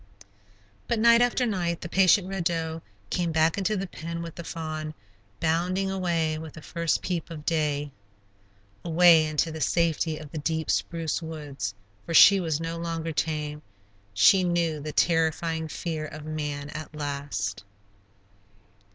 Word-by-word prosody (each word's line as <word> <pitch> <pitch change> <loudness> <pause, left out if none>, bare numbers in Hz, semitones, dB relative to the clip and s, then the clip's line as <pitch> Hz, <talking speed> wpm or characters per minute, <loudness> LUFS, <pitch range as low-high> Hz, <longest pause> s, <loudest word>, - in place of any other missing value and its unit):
But 235 - +1
night 235 +1 +6
after 245 +1 +2
night 175 -6 -1
the - - -5
patient 185 +1 +4
Red 190 -3 -3
Doe 165 -1 -1 0.3
came 175 -2 0
back 160 +3 +2
into 210 +2 0
the 190 - -2
pen 170 -2 -6
with 165 -1 -7
the 170 - -8
fawn, 155 -2 -5 0.4
bounding 180 +4 0
away 165 -4 0
with 160 -1 -8
the 155 - -11
first 170 -2 -1
peep 175 -3 -3
of 155 -3 -8
day. 150 -3 0 0.9
Away, 170 -1 +6
into 155 +2 0
the 160 0 -6
safety 165 -1 +1
of 150 -2 -10
the 155 - -4
deep 160 +1 -1
spruce 165 -1 -1
woods, 145 -10 -5 0.3
for 165 - -3
she 200 +3 +9
was 160 -4 -1
no 165 0 -4
longer 165 -1 -3
tame; 150 -1 -2 0.5
she 105 - +5
knew 170 -3 0
the 150 +1 -5
terrifying 160 0 +1
fear 155 -1 -4
of 155 0 -9
man, 150 -2 -4
at 155 0 -8
last. 140 -10 -3
160 Hz, 150 wpm, -26 LUFS, 155-170 Hz, 0.9 s, she